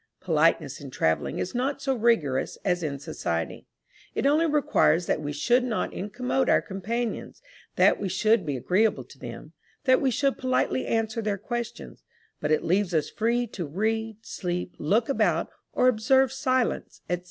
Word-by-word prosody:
Politeness 155 -5 +1
in 140 - -8
travelling 80 -10 0
is 180 - -3
not 260 +3 -1
so 270 -1 0
rigorous 220 - +1
as 180 -2 +1
in 145 -4 -2
society; 85 -11 -4 0.5
it - - -1
only 305 +4 +4
requires 285 - +3
that 155 - 0
we 145 -1 -3
should 240 - +2
not 240 -3 -2
incommode 250 +6 -1
our - - +5
companions; 225 +5 -4 0.4
that - - +4
we 195 - -1
should 215 +3 +3
be 145 -4 -2
agreeable 195 - +1
to - - -17
them; - - -9 0.3
that 260 -2 +4
we 270 - +3
should 275 +3 0
politely 255 0 0
answer 225 0 0
their 210 -2 -1
questions; 235 +3 -6 0.4
but 150 - -2
it 155 - +2
leaves 185 0 +1
us 155 - 0
free 235 +2 +1
to 185 -8 -6
read, 220 +6 -1
sleep, 180 -1 -3
look 215 +10 +2
about, 275 - +1 0.2
or 250 - +3
observe 255 +3 +3
silence, 260 -2 -1
&c. 175 0 -1
220 Hz, 165 wpm, -26 LUFS, 175-250 Hz, 0.5 s, our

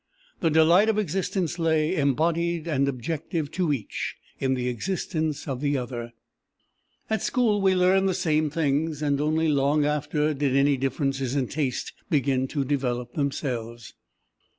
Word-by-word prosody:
The 165 - +2
delight 165 +7 +5
of 220 - +1
existence 185 -2 -1
lay, 160 +1 +2
embodied 165 +3 +1
and 140 -4 +1
objective 150 +3 -3
to 175 -4 0
each, 135 -7 -3 0.2
in 130 -1 +1
the 125 -1 -2
existence 155 - -2
of 135 -2 -3
the 145 -1 +1
other. 120 -2 -5 0.9
"At 220 0 -1
school 220 -5 +1
we 190 -1 +3
learned 190 +1 +3
the 185 - 0
same 155 -4 +1
things, 155 0 0
and 145 -1 +1
only 155 +2 +1
long 145 0 +2
after 150 +1 0
did 140 -2 0
any 140 +1 +4
differences 135 0 -1
in 130 -4 0
taste 140 -4 -2 0.2
begin 135 -5 +1
to 140 0 -2
develop 125 -3 -2
themselves. 120 -5 -3
150 Hz, 150 wpm, -25 LUFS, 135-165 Hz, 0.9 s, delight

